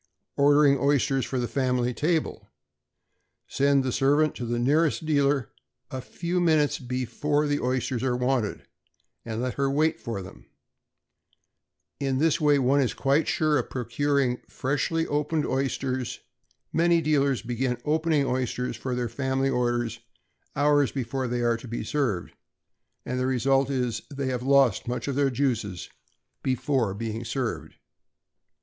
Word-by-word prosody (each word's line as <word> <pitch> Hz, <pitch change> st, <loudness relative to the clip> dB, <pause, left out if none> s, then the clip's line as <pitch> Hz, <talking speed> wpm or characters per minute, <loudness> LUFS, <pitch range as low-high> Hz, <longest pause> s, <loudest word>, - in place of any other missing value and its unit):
=Ordering 145 Hz, -1 st, +5 dB
Oysters 140 Hz, -2 st, +2 dB
for 130 Hz, -, -3 dB
the 120 Hz, -1 st, -1 dB
Family 125 Hz, -2 st, 0 dB
Table.= 160 Hz, +5 st, -1 dB, 1.0 s
Send 140 Hz, 0 st, +2 dB
the 130 Hz, -, -1 dB
servant 145 Hz, +4 st, +2 dB
to 120 Hz, -, -5 dB
the 120 Hz, +1 st, -1 dB
nearest 150 Hz, +6 st, +2 dB
dealer, 140 Hz, -5 st, +1 dB, 0.4 s
a 130 Hz, -, -4 dB
few 170 Hz, +7 st, -3 dB
minutes 155 Hz, -4 st, +2 dB
before 130 Hz, +4 st, -1 dB
the 145 Hz, 0 st, 0 dB
oysters 125 Hz, -1 st, -1 dB
are 130 Hz, -2 st, 0 dB
wanted, 125 Hz, -4 st, -1 dB, 0.6 s
and 115 Hz, +1 st, -4 dB
let 125 Hz, -, -2 dB
her 140 Hz, 0 st, 0 dB
wait 155 Hz, +3 st, +1 dB
for 105 Hz, -5 st, -5 dB
them. 60 Hz, -10 st, -13 dB, 1.5 s
In 135 Hz, -2 st, 0 dB
this 160 Hz, +3 st, +2 dB
way 145 Hz, -1 st, +4 dB
one 135 Hz, +1 st, +3 dB
is 130 Hz, -, 0 dB
quite 140 Hz, +3 st, +2 dB
sure 155 Hz, -2 st, +2 dB
of -, -, -4 dB
procuring 130 Hz, +1 st, 0 dB
freshly 145 Hz, +4 st, -1 dB
opened 150 Hz, +1 st, -1 dB
oysters. 130 Hz, -1 st, -2 dB, 0.5 s
Many 170 Hz, +1 st, +4 dB
dealers 140 Hz, -5 st, +1 dB
begin 125 Hz, +1 st, -1 dB
opening 155 Hz, -1 st, +2 dB
oysters 125 Hz, -1 st, -2 dB
for 125 Hz, +2 st, -4 dB
their 125 Hz, -1 st, -1 dB
family 135 Hz, +2 st, -1 dB
orders 120 Hz, -2 st, -1 dB, 0.6 s
hours 145 Hz, -1 st, +3 dB
before 130 Hz, 0 st, -3 dB
they 120 Hz, 0 st, -1 dB
are 120 Hz, -1 st, +2 dB
to 120 Hz, -, -11 dB
be 115 Hz, -, -4 dB
served; 120 Hz, -12 st, -1 dB, 0.7 s
and 125 Hz, +1 st, -2 dB
the 130 Hz, -, 0 dB
result 135 Hz, +1 st, +2 dB
is, 125 Hz, -4 st, -1 dB
they 140 Hz, -2 st, -3 dB
have 125 Hz, -2 st, -2 dB
lost 130 Hz, -5 st, +3 dB
much 125 Hz, +3 st, -3 dB
of 140 Hz, -, -1 dB
their 140 Hz, 0 st, +2 dB
juices 115 Hz, -8 st, -2 dB, 0.5 s
before 130 Hz, -5 st, 0 dB
being 115 Hz, +1 st, -4 dB
served. 115 Hz, -, -4 dB
135 Hz, 145 wpm, -26 LUFS, 125-145 Hz, 1.5 s, =Ordering